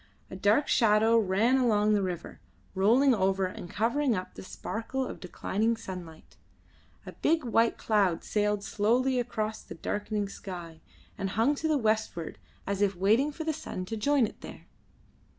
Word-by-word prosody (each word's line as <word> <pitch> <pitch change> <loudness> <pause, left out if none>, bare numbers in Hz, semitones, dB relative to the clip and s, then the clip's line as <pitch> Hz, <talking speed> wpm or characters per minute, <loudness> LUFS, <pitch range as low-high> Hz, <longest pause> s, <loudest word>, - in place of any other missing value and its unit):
A - - -6
dark 205 +9 +2
shadow 220 0 +4
ran 220 +5 +2
along 215 -4 +3
the 205 - +2
river, 180 -3 -5 0.3
rolling 235 +8 +4
over 195 -2 +1
and 185 -1 -7
covering 240 +5 +1
up 185 -1 -5
the - - -9
sparkle 230 +7 -4
of - - -7
declining 215 +5 -1
sunlight. 180 -6 -9 0.7
A - - -7
big 320 0 +1
white 230 -1 +2
cloud 200 -6 +1
sailed 210 -1 0
slowly 250 +6 +1
across 220 -3 -3
the - - -10
darkening 205 0 -3
sky, 175 -5 -8 0.4
and 195 -1 -1
hung 225 +8 +2
to 315 +2 -2
the 310 -2 +2
westward 215 - -1 0.3
as 200 0 -2
if 200 -2 +2
waiting 220 +11 +2
for 320 +2 -6
the 315 0 -1
sun 185 -11 -6
to 225 - -4
join 275 +3 +2
it - - -9
there. - - -10
215 Hz, 165 wpm, -29 LUFS, 195-245 Hz, 0.7 s, shadow